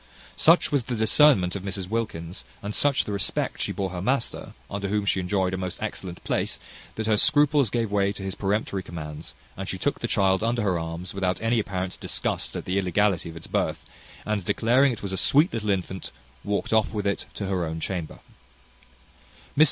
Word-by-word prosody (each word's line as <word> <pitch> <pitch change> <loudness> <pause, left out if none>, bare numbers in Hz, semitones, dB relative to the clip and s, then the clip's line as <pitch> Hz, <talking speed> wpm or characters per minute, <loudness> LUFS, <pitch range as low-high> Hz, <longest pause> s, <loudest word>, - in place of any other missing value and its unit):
Such 165 +2 +5
was 140 -5 +1
the 125 - -2
discernment 110 -4 +5
of 100 - -3
Mrs 95 -1 -3
Wilkins, 95 -5 -3 0.2
and 100 +1 -3
such 145 +3 +3
the - - -5
respect 100 -1 -1
she - - 0
bore 95 -2 -2
her 90 -1 -4
master, 125 +5 -1
under 100 0 -3
whom 105 0 0
she 100 - +2
enjoyed 95 0 0
a - - -1
most 90 -1 -4
excellent 90 -2 -5
place, - - -1 0.4
that 110 - -3
her 110 -1 +3
scruples 145 0 +4
gave 115 -1 -1
way 100 -1 +2
to 95 - -8
his 95 -1 -3
peremptory 100 -1 -1
commands; 75 -4 -8 0.2
and - - -5
she - - -2
took - - -1
the - - -2
child 95 0 +2
under 115 0 +1
her 90 -4 +1
arms, 85 +2 -5
without 95 -1 0
any 115 +1 +2
apparent 95 -3 -3
disgust - - -2
at - - -4
the 95 +2 +1
illegality 95 -1 +1
of 80 - -9
its 80 - -10
birth; - - -1 0.4
and 105 -2 -1
declaring 125 +8 +3
it 115 -2 -6
was 95 -1 -3
a - - -1
sweet 150 - +4
little 110 -2 -2
infant, 95 -1 -2 0.3
walked 100 +2 -1
off 110 -1 +3
with 105 -2 -3
it 100 -1 -1
to 100 - -3
her 95 -2 0
own 80 0 -3
chamber. 85 -2 -4
100 Hz, 200 wpm, -26 LUFS, 95-110 Hz, 0.4 s, Such